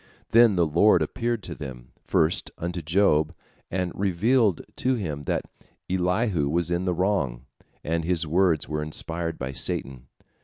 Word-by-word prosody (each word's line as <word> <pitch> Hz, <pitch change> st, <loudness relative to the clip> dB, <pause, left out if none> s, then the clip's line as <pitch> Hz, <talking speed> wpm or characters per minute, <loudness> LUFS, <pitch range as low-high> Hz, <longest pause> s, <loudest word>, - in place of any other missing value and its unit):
Then 115 Hz, -3 st, +6 dB
the 85 Hz, -2 st, +3 dB
Lord 85 Hz, +7 st, +4 dB
appeared 120 Hz, -3 st, -2 dB
to 85 Hz, -, -5 dB
them, 65 Hz, -5 st, -9 dB
first 80 Hz, +1 st, +1 dB
unto 85 Hz, +1 st, -4 dB
Job, 80 Hz, -1 st, +2 dB, 0.3 s
and 90 Hz, -1 st, -2 dB
revealed 100 Hz, +2 st, +2 dB, 0.2 s
to 130 Hz, 0 st, +1 dB
him 80 Hz, -10 st, -4 dB
that -, -, -1 dB, 0.5 s
Elihu 90 Hz, -3 st, +1 dB
was 85 Hz, +2 st, 0 dB
in 85 Hz, +1 st, 0 dB
the 90 Hz, -, +1 dB
wrong, 80 Hz, -10 st, 0 dB, 0.4 s
and 85 Hz, +1 st, -1 dB
his 85 Hz, -1 st, 0 dB
words 85 Hz, 0 st, +2 dB
were 75 Hz, 0 st, -2 dB
inspired 80 Hz, +2 st, -3 dB
by 65 Hz, 0 st, -4 dB
Satan. 65 Hz, -1 st, -3 dB
85 Hz, 150 wpm, -25 LUFS, 75-95 Hz, 0.5 s, Then